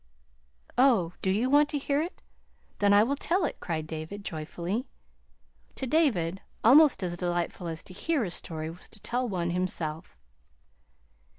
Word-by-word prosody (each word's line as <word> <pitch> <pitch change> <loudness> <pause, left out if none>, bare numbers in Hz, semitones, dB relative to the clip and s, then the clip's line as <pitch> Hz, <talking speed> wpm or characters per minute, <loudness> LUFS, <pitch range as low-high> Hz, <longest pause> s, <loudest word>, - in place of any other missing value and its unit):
"Oh, 225 -11 +4
do 190 - 0
you 215 +6 +2
want 290 +2 +5
to 295 - -1
hear 285 +1 0
it? 340 +3 -6 0.6
Then 205 -1 +4
I 205 +1 +7
will 270 +5 0
tell 340 +5 +1
it," - - -4
cried 160 -3 -3
David 160 +6 -7
joyfully. 175 - -3 0.9
To 265 - -4
David, 220 - +1 0.2
almost 260 -3 +6
as 175 -1 -2
delightful 175 0 -2
as 165 -1 -5
to 185 - -12
hear 295 - 0
a 185 - -3
story 160 -2 -5
was 175 - -14
to 215 - -11
tell 245 +3 -2
one 175 -3 -1
himself. 170 -3 -3
195 Hz, 160 wpm, -28 LUFS, 170-265 Hz, 0.9 s, I